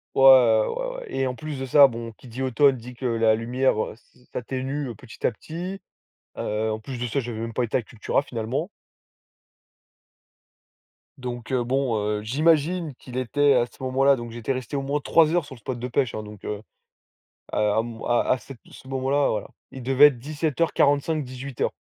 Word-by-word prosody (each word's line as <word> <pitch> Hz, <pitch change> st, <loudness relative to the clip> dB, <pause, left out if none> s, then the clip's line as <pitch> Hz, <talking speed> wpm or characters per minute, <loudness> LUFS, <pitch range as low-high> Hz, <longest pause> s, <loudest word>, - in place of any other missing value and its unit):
Ouais, -, -, +2 dB
ouais 130 Hz, -, +6 dB
ouais. -, -, -9 dB
Et 135 Hz, -, -1 dB
en 130 Hz, -, -1 dB
plus 150 Hz, +1 st, -6 dB
de 135 Hz, -, -3 dB
ça, 140 Hz, +2 st, +7 dB
bon, 115 Hz, -1 st, -6 dB
qui 120 Hz, +3 st, -16 dB
dit 125 Hz, +3 st, -5 dB
automne 130 Hz, +1 st, +4 dB
dit 125 Hz, +2 st, -10 dB
que 125 Hz, +2 st, -8 dB
la 115 Hz, -2 st, +3 dB
lumière 125 Hz, +4 st, +1 dB, 0.2 s
s'a 120 Hz, -, -28 dB
s'atténue 130 Hz, +2 st, -3 dB
petit 115 Hz, +2 st, -9 dB
à -, -, +4 dB
petit, 180 Hz, -, -7 dB, 0.6 s
heu, 110 Hz, +1 st, -1 dB
en 110 Hz, -, -4 dB
plus 125 Hz, +3 st, -7 dB
de 125 Hz, -, -2 dB
ça 130 Hz, +4 st, -1 dB
j'avais 115 Hz, -2 st, -5 dB
même 115 Hz, 0 st, -4 dB
pas 125 Hz, -, 0 dB
été 115 Hz, -, 0 dB
à -, -, -1 dB
Cultura 110 Hz, +3 st, -1 dB
finalement. 130 Hz, -, -3 dB, 2.5 s
Donc, 125 Hz, -1 st, -6 dB
heu, 125 Hz, -2 st, +1 dB
bon, 130 Hz, -1 st, 0 dB, 0.2 s
heu, -, -, -9 dB
j'imagine 155 Hz, +4 st, +1 dB
qu'il 125 Hz, -1 st, -9 dB
était 140 Hz, +3 st, +3 dB
à 120 Hz, -2 st, +3 dB
ce 130 Hz, -, -14 dB
moment-là 135 Hz, +2 st, +4 dB
donc 120 Hz, -2 st, -7 dB
j'étais 120 Hz, +3 st, -3 dB
resté 130 Hz, +2 st, -4 dB
au 140 Hz, -, 0 dB
moins 140 Hz, +2 st, -1 dB
3 160 Hz, +2 st, +4 dB
heures 175 Hz, -3 st, +1 dB
sur 140 Hz, -, -10 dB
le 120 Hz, -, -13 dB
spot 125 Hz, +3 st, -4 dB
de 125 Hz, +1 st, -4 dB
pêche 125 Hz, -1 st, 0 dB
hein, 110 Hz, -, -4 dB
donc, 105 Hz, -1 st, -11 dB
heu, 105 Hz, -, -3 dB
heu 105 Hz, -, -15 dB, 0.9 s
à 105 Hz, +1 st, +2 dB
mon 115 Hz, -1 st, -8 dB
à 120 Hz, -, +3 dB
à 130 Hz, -, +3 dB
cet 135 Hz, -1 st, -11 dB
ce 130 Hz, -, -14 dB
moment-là 135 Hz, +2 st, +1 dB
voilà. 105 Hz, -, -2 dB, 0.2 s
Il 130 Hz, -, -9 dB
devait 135 Hz, +3 st, +6 dB
être 140 Hz, -, -1 dB
17:45-18:00 145 Hz, -2 st, 0 dB
130 Hz, 195 wpm, -25 LUFS, 115-140 Hz, 2.5 s, ça